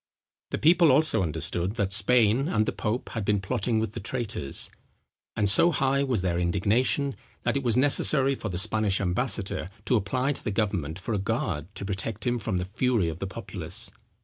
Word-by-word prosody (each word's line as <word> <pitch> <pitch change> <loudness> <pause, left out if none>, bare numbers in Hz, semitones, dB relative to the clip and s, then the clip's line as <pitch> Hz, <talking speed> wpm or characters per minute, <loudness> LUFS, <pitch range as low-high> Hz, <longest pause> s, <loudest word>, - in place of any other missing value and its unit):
The - - -2
people 165 0 +5
also 150 -4 +4
understood 85 +4 -1
that 100 -4 0
Spain 115 +5 +3
and 110 -11 +1
the - - -1
pope 110 +4 -3
had 110 - -4
been 105 0 +1
plotting 110 +3 -1
with 110 -2 -1
the - - -5
traitors; 110 - -2 0.6
and 105 - +1
so 135 - +4
high 135 -1 +1
was 125 -9 0
their 85 -2 0
indignation, 105 +9 +1 0.3
that 120 - 0
it 140 - +1
was 120 -3 +1
necessary 135 0 +4
for 110 -5 -5
the 90 - -3
Spanish 110 0 +1
ambassador 100 -1 -2 0.2
to 125 - +2
apply 125 +6 0
to 145 - -6
the - - -2
government 95 -7 -1
for 95 +4 -4
a 105 - 0
guard 75 -5 -2
to - - -5
protect 100 +5 -3
him 120 -1 0
from 105 -3 -2
the 90 - -2
fury 110 -2 0
of 80 +1 -6
the 95 - -3
populace. 95 -5 -5
105 Hz, 195 wpm, -27 LUFS, 95-125 Hz, 0.6 s, people